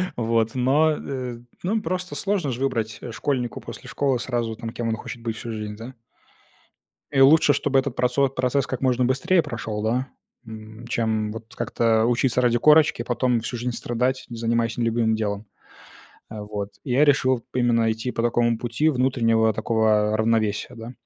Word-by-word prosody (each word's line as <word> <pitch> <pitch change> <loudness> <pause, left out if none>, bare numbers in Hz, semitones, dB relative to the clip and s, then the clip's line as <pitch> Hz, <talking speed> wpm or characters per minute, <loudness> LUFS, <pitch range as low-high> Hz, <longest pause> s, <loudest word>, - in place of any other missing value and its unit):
Вот, 115 0 0
но, 140 +5 +3
э, 130 -5 -5 0.2
ну, 215 +5 0
просто 180 -1 -3
сложно 195 -8 -1
ж 120 - -4
выбрать, 115 -5 -2
э, 120 - -6
школьнику 125 0 -2
после - - -10
школы 135 -3 0
сразу 120 -2 -2
там, 115 - -6
кем 115 +1 -4
он 115 - 0
хочет 120 +1 -8
быть 115 -1 -3
всю 115 +1 -6
жизнь, 105 -1 -5
да? 115 +4 -9 1.2
И 135 -1 +3
лучше, 145 +1 +6
чтобы 135 0 +2
этот 130 -2 -3
процо 125 +2 +2
процесс 130 0 0
как 130 - -4
можно 125 -1 +2
быстрее 170 +8 +2
прошёл, 115 -7 -5
да, 125 +4 0 0.4
м, 110 +1 -10
чем 110 -2 -1
вот 110 +1 -10
как-то 115 -1 +1
учиться 125 +1 +2
ради 120 -1 +3
корочки, 150 -1 +4
потом 125 0 +1
всю 120 +2 -5
жизнь 125 +2 -2
страдать, 125 +2 -1
занимаясь 115 0 -1
нелюбимым 115 -1 +1
делом, 105 -1 -3 0.9
э, 110 - -7
вот, 105 -1 -5 0.2
и 130 - -3
я 140 +4 +5
решил 130 -4 +2
именно 120 -2 +2
идти 115 +3 -3
по 115 - -2
такому 120 0 +2
пути 120 +7 0
внутреннего 120 -5 +2
такого 110 -1 +1
равновесия, 110 +1 0
да. 115 +1 -8
120 Hz, 170 wpm, -23 LUFS, 110-130 Hz, 1.2 s, лучше